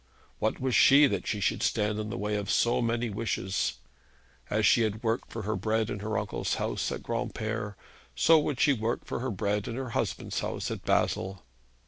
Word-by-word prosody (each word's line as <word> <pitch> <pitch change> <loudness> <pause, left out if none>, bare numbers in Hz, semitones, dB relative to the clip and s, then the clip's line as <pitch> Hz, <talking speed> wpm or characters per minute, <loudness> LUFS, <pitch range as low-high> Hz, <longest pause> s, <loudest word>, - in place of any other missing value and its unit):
What 110 - 0
was 130 -1 -1
she 140 +5 +7
that 140 - -1
she 105 - -1
should 100 - 0
stand 105 -1 +1
in 110 0 -3
the - - -4
way 105 +1 -1
of 100 -2 -3
so 120 +1 +2
many 115 0 0
wishes? 100 -3 -1 0.7
As 110 +1 +1
she 120 - +5
had 110 0 -1
worked 115 +2 -1
for 115 - -5
her 110 +2 -1
bread 110 +3 0
in 100 - -4
her 110 +1 -2
uncle's 105 -1 -2
house - - -2
at - - -5
Granpere, 110 -2 -3 0.4
so 160 - +6
would 145 -3 -2
she 145 -1 +5
work 115 -1 -2
for - - -3
her 130 +2 -2
bread 100 0 -1
in 115 - -4
her 130 -1 -4
husband's - - -2
house - - -3
at - - -5
Basle. 95 -1 0
110 Hz, 200 wpm, -29 LUFS, 105-120 Hz, 0.7 s, she